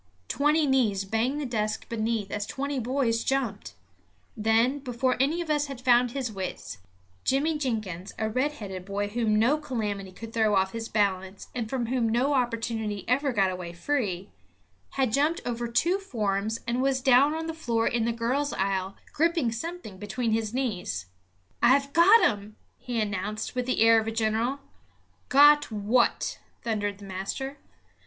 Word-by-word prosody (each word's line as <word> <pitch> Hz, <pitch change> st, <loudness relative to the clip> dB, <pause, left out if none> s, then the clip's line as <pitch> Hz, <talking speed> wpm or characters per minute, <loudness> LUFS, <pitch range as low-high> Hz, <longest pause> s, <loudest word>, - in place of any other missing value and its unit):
Twenty 300 Hz, +3 st, +2 dB
knees 225 Hz, -8 st, +2 dB
banged 230 Hz, +8 st, 0 dB
the 295 Hz, -, -2 dB
desks 220 Hz, -3 st, -2 dB
beneath 220 Hz, -3 st, -2 dB
as 205 Hz, 0 st, -3 dB
twenty 280 Hz, 0 st, -3 dB
boys 240 Hz, -2 st, 0 dB
jumped. 245 Hz, -, -2 dB, 0.6 s
Then, 225 Hz, +6 st, +2 dB
before 255 Hz, -1 st, 0 dB
any 300 Hz, +6 st, +2 dB
of 325 Hz, -3 st, -3 dB
us 295 Hz, -1 st, +1 dB
had 275 Hz, -3 st, -7 dB
found 245 Hz, -1 st, +4 dB
his 250 Hz, -2 st, -3 dB
wits, 190 Hz, -, -6 dB, 0.4 s
Jimmy 295 Hz, +4 st, +1 dB
Jenkins, 215 Hz, -, -3 dB
a 220 Hz, -, -1 dB
red 255 Hz, +7 st, 0 dB
headed 190 Hz, -8 st, -7 dB
boy 200 Hz, +1 st, -3 dB
whom 220 Hz, -1 st, +1 dB
no 250 Hz, +8 st, +3 dB
calamity 210 Hz, -9 st, -3 dB
could 225 Hz, +4 st, -10 dB
throw 220 Hz, -2 st, +2 dB
off 190 Hz, 0 st, +2 dB
his 225 Hz, +1 st, -5 dB
balance 190 Hz, -2 st, -1 dB
and 235 Hz, -3 st, -3 dB
from 255 Hz, -2 st, -1 dB
whom 235 Hz, -1 st, 0 dB
no 250 Hz, +6 st, +2 dB
opportunity 225 Hz, -4 st, -1 dB
ever 275 Hz, +3 st, +2 dB
got 195 Hz, -5 st, +2 dB
away 180 Hz, -2 st, -6 dB
free, 195 Hz, -3 st, -2 dB, 0.6 s
had 260 Hz, -5 st, 0 dB
jumped 300 Hz, +5 st, +2 dB
over 240 Hz, -1 st, -2 dB
two 335 Hz, +11 st, +1 dB
forms 215 Hz, -, -2 dB
and 240 Hz, +2 st, 0 dB
was 270 Hz, 0 st, +2 dB
down 270 Hz, +3 st, +5 dB
on 320 Hz, 0 st, -3 dB
the 325 Hz, -, -3 dB
floor 235 Hz, -8 st, 0 dB
in 230 Hz, -1 st, +1 dB
the 235 Hz, -, +1 dB
girls' 250 Hz, +5 st, -1 dB
aisle, 190 Hz, 0 st, -1 dB, 0.2 s
gripping 330 Hz, -6 st, +2 dB
something 235 Hz, -, -6 dB
between 220 Hz, +4 st, -2 dB
his 220 Hz, -1 st, 0 dB
knees 195 Hz, -, -2 dB, 0.6 s
"I've 275 Hz, +3 st, +4 dB
got 380 Hz, +7 st, +7 dB
him," 210 Hz, 0 st, -4 dB, 0.2 s
he 245 Hz, -2 st, -3 dB
announced, 210 Hz, +1 st, -3 dB
with 250 Hz, -1 st, -2 dB
the 255 Hz, -, 0 dB
air 225 Hz, 0 st, +7 dB
of 220 Hz, -, -4 dB
a -, -, -1 dB
general. 225 Hz, +5 st, 0 dB, 0.7 s
"Got 290 Hz, 0 st, +6 dB
what?" 220 Hz, +4 st, +1 dB, 0.2 s
thundered 205 Hz, -3 st, -1 dB
the 200 Hz, -, -11 dB
master. 195 Hz, +9 st, -5 dB
230 Hz, 165 wpm, -27 LUFS, 210-270 Hz, 0.7 s, got